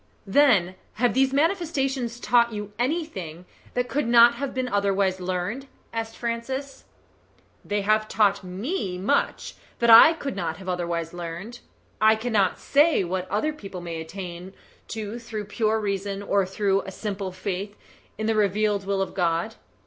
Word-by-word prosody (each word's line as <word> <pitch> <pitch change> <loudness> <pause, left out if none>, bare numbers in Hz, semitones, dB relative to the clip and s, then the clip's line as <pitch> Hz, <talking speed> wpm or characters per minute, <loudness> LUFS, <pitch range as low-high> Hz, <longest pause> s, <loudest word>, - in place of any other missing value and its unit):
"Then 195 -6 +4 0.2
have 240 -1 +1
these 265 +1 +3
manifestations 275 - 0
taught 235 -1 +3
you 210 -1 -6
anything 240 - -3 0.3
that 245 0 0
could 275 -1 -1
not 235 0 +7
have 275 +3 -4
been 255 -1 -2
otherwise 200 -3 +1
learned?" 185 +9 -3 0.3
asked 225 0 -4
Francis. 260 +4 -4 0.8
"They 205 0 -1
have 215 +1 +2
taught 200 -3 +2
ME 190 - -3
much 190 +3 0 0.2
that 235 -1 +4
I 230 +8 +10
could 285 -5 -5
not 160 - -3
have 190 0 -11
otherwise 170 -2 -2
learned. 175 +7 -7 0.4
I 220 0 +6
cannot 220 -4 +1
say 290 -4 +3
what 185 +1 -3
other 220 +11 0
people 195 -10 -8
may 170 -2 -5
attain 180 +2 -8 0.3
to 220 +1 -5
through 225 -3 -6
pure 220 +1 0
reason 200 -1 -3
or 200 -1 +1
through 195 0 +1
a 195 - -8
simple 195 -1 -4
faith 195 +2 -5 0.4
in 220 - -3
the 225 - +2
revealed 205 -1 +1
will 195 -1 +1
of - - -7
God. 175 +3 0
210 Hz, 155 wpm, -25 LUFS, 190-240 Hz, 0.8 s, I